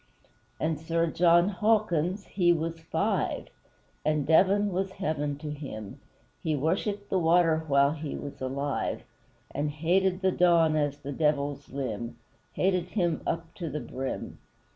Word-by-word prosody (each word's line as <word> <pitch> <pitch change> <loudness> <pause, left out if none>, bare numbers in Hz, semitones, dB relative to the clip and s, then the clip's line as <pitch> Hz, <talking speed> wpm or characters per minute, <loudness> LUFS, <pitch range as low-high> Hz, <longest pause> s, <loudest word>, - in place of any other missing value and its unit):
And 155 -1 0
Sir 165 +1 0
JOHN 170 +2 +4
HAWKINS, 200 -4 +2
he 175 -3 +2
was 165 0 -1
FIVE 160 - -1 0.5
And 150 -2 +1
Devon 195 +5 +4
was 190 +1 -2
heaven 150 -7 -2
to 150 0 -6
him, 120 -9 -7 0.4
He 155 -1 0
worshipped 200 +7 -1
the 190 - +3
water 165 -1 +3
while 140 0 +4
he 155 -1 -5
was 140 -2 -7
alive 135 +2 -2 0.5
And 145 +1 -1
hated 180 +5 +1
the 190 -1 +3
Don 170 -3 +4
as 145 -2 0
the 145 -1 -7
Devil's 145 -1 0
limb 130 -3 -4 0.4
Hated 185 -2 +1
him 175 -4 -1
up 165 0 -3
to 170 -4 -5
the 150 +2 -3
brim! 135 -2 -5
160 Hz, 140 wpm, -28 LUFS, 145-180 Hz, 0.5 s, JOHN